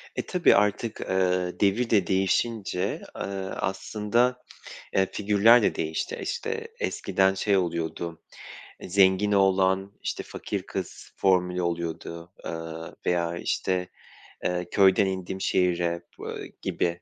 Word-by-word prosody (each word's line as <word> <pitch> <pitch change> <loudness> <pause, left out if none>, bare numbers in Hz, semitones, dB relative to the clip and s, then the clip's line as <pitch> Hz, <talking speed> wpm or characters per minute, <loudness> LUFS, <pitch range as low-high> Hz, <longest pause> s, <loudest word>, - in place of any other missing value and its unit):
E, - - -2
tabii 180 -2 +4
artık, 105 +2 +1
eee, 90 -1 0
devir 105 +4 +2
de 100 -5 +3
değişince, 95 0 0
eee, - - -6 0.3
aslında, 110 +6 0 0.5
eee, 95 - +4
figürler 105 +4 +5
de - - +2
değişti. 80 0 -3
İşte, 455 -1 -3
eskiden 95 - +1
şey 100 +1 +2
oluyordu, 85 -1 -3 0.6
eee, - - -8
zengin 95 +2 +4
oğlan, 95 0 +3
işte, - - -3
fakir - - -5
kız - - -6
formülü 90 -1 +2
oluyordu. 85 0 -4
Iıı, 80 0 -6
veya, 85 -1 0
işte, 90 +1 -1 0.5
eee, 90 -1 -1
köyden 100 0 +5
indim 95 0 -3
şehire, 85 -2 +1 0.2
ııı, - - -6 0.2
gibi 85 +1 -1
95 Hz, 120 wpm, -26 LUFS, 90-100 Hz, 0.6 s, figürler